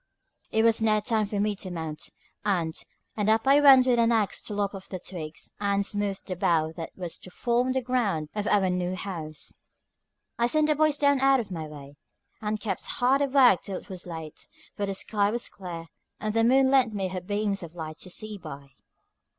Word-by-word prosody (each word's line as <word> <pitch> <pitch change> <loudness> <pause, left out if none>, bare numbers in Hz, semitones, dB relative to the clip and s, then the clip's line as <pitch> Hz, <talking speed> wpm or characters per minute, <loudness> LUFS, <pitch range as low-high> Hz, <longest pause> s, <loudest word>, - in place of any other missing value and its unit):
It 220 - +2
was 230 0 +4
now 215 -1 +3
time 215 -1 0
for 205 0 -3
me 210 0 +1
to 190 - -5
mount, 160 -3 -6 0.3
and 175 -6 0 0.4
up 220 +2 +2
I 280 +2 +6
went 270 -3 +8
with 245 -2 +3
an 230 0 +4
axe 220 -3 +1
to 210 - -5
lop 205 -1 -1
off 195 -1 -9
the 185 - -4
twigs 170 -4 -6
and 200 -1 +1
smooth 205 -1 -2
the 185 - -4
bough 160 -3 +1
that 165 - -5
was 175 -3 -5
to - - -11
form 245 +6 0
the 260 -1 -1
ground 210 -12 0
of 210 -1 -2
our 195 -3 +3
new 180 0 -1
house. 165 -6 -6 0.8
I 235 - +4
sent 305 +4 +2
the 305 - +4
boys 305 -1 +3
down 285 -1 +3
out 270 0 +4
of 215 -5 -5
my 160 -3 -4
way, 145 -1 -11 0.4
and 215 0 -2
kept 200 -3 -3
hard 260 +3 +3
at 275 -2 0
work 255 -9 +6
till 195 -2 -5
it - - -12
was 185 -2 -6
late, 160 -3 -8 0.3
for 205 -1 -2
the 195 - -2
sky 205 +1 +1
was 235 +3 -2
clear, 175 -4 -8 0.3
and 215 0 -2
the 225 0 +3
moon 265 +3 +4
lent 255 -5 +3
me 190 -2 -1
her 185 0 -4
beams 205 +1 -1
of 170 -1 -9
light 155 -2 -7
to 185 - -5
see 215 +2 -4
by. 140 -4 -10
205 Hz, 215 wpm, -27 LUFS, 180-235 Hz, 0.8 s, went